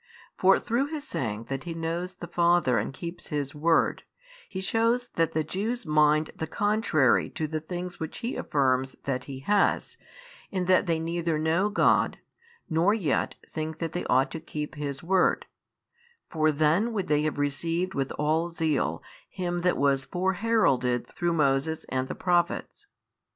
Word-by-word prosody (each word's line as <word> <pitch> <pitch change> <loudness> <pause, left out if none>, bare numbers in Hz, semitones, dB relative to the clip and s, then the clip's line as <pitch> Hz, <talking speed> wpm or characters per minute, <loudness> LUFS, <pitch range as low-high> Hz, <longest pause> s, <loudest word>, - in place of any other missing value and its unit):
For 190 +1 +5
through 240 +4 0
His 300 -1 -6
saying 110 -3 -3
that 135 +5 -5
He 170 -1 -4
knows 170 +3 -3
the 175 - -8
Father 170 -8 +3
and 105 - -3
keeps 170 +6 -8
His 145 -3 -3
word, 165 +2 +2 0.5
He 190 - -5
shews 230 +5 +1
that 165 -1 +1
the 155 - +1
Jews 220 +7 -3
mind 155 0 +3
the 160 - -4
contrary 205 - +2
to 155 - -3
the 155 +1 -2
things 175 +3 -6
which 160 -1 -5
He 245 - -2
affirms 130 -2 0
that 130 -3 -2
He 135 -1 -7
has, 205 +7 +1 0.5
in 185 -2 -2
that 185 +1 +3
they 165 -1 +2
neither 165 0 -1
know 165 +6 +1
God, 205 - +3 0.5
nor 170 +6 +3
yet 165 -11 0
think 155 0 -4
that 165 -1 -3
they 175 - -3
ought 130 +2 +2
to 160 - -5
keep 150 -1 -5
His 140 -1 -5
word: 185 +1 +2 0.9
for 155 -1 +2
then 155 +10 +2
would 200 -4 -1
they 150 -1 +2
have 155 -1 -1
received 165 +6 -1
with 135 -1 -2
all 160 +3 0
zeal 155 - -1 0.3
Him 175 -2 -3
that 180 0 +2
was 135 -2 +2
foreheralded 180 - +1
through 175 -1 -2
Moses 150 +1 +1
and 130 0 -1
the - - -5
Prophets. 180 - 0
165 Hz, 165 wpm, -27 LUFS, 145-180 Hz, 0.9 s, For